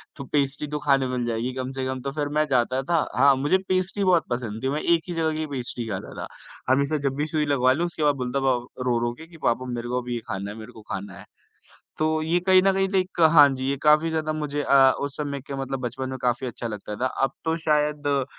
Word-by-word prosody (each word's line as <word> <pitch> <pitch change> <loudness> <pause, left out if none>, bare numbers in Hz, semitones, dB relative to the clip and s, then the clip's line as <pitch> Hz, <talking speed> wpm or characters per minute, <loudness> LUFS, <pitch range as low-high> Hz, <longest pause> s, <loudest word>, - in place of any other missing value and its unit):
तो 140 - -7
पेस्ट्री 140 +1 -1
तो 150 +1 -3
खाने 140 -3 +2
मिल 125 -1 -2
जाएगी 120 +2 -2
कम 130 0 -4
से 135 -1 -4
कम, 130 0 -3
तो 140 +2 -3
फिर 145 0 -2
मैं 155 - +3
जाता 130 +1 +2
था 165 +4 +1 0.2
हाँ 140 -1 +6
मुझे 145 +7 +2
पेस्ट्री 185 +2 0
बहुत 180 -3 +3
पसंद 120 -2 -4
थी। 130 - +1
मैं 150 +3 -1
एक 170 -1 +3
ही - - -2
जगह 160 -1 0
की 155 - -2
पेस्ट्री 125 -3 -4
खाता 95 -3 -5
था। - - -6 0.5
हमेशा 140 +3 +1
जब 135 - -2
भी 145 +2 -1
सुई 155 -1 0
लगवा 130 -3 +3
लूँ, 165 +6 0
उसके 170 -3 -4
बाद 145 -1 +3
बोलता 125 +1 -2
पा 130 - +4 0.3
रो-रो 120 -1 +1
के 160 - -10
कि 165 -1 -14
पापा 125 +2 +1
मेरे 120 0 -4
को 125 +1 0
अभी 125 0 -5
ये - - -2
खाना 100 +1 -4
है, 105 - -9
मेरे 110 -1 -10
को 110 - -13
खाना 100 +2 -5
है। - - -12 0.7
तो 155 - +2 0.2
ये 165 +3 +2
कहीं 185 +1 +5
न 195 0 +4
कहीं 195 0 +1
लाइक 185 -2 -1
हाँ 150 -3 +8
जी, 130 0 -5
ये 140 - 0
काफ़ी 150 +2 +4
ज़्यादा 155 -1 -1
मुझे 150 -1 -3
अ, 135 -2 +6
उस 140 -1 -4
समय 140 -2 -3
के 140 +1 -8
मतलब 135 0 -3
बचपन 130 +2 -4
में 130 - -5
काफ़ी 125 +1 0
अच्छा 120 -1 -5
लगता 105 -1 -6
था। 125 - -1 0.2
अब 135 - -1
तो 160 0 0
शायद 150 -1 +1
अ, 140 -2 +2
140 Hz, 260 wpm, -24 LUFS, 125-155 Hz, 0.7 s, हाँ